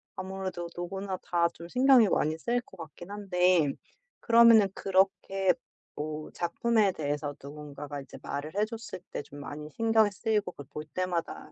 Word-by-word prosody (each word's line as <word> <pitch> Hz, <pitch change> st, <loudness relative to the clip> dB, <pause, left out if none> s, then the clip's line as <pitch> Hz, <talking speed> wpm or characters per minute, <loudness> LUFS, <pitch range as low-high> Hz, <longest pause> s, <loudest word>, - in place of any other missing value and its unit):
아무래도 190 Hz, -2 st, -4 dB
누구나 190 Hz, +2 st, -4 dB
다 170 Hz, -1 st, +2 dB
좀 170 Hz, +1 st, -10 dB
신경이 250 Hz, 0 st, +6 dB
많이 155 Hz, +1 st, +1 dB
쓰일 240 Hz, +7 st, 0 dB
것 -, -, -17 dB
같긴 170 Hz, +3 st, -10 dB
한데. 180 Hz, -6 st, +2 dB, 0.5 s
그러면은 230 Hz, -3 st, +7 dB
그렇게 195 Hz, 0 st, +2 dB, 0.4 s
뭐 150 Hz, 0 st, -5 dB
작품에 210 Hz, +4 st, +1 dB
대해서 145 Hz, -1 st, -2 dB
누군가가 145 Hz, 0 st, -7 dB
이제 -, -, -12 dB
말을 150 Hz, +4 st, -5 dB
해 210 Hz, +1 st, +2 dB
줬을 225 Hz, -4 st, -7 dB
때 -, -, -3 dB
좀 145 Hz, -, -12 dB
많이 145 Hz, +1 st, -7 dB
신경이 225 Hz, -2 st, +3 dB
쓰이고 210 Hz, -1 st, 0 dB
그걸 145 Hz, -, -11 dB
볼 150 Hz, +1 st, -6 dB
때마다 175 Hz, +2 st, -3 dB
180 Hz, 325 characters per minute, -29 LUFS, 155-205 Hz, 0.5 s, 그러면은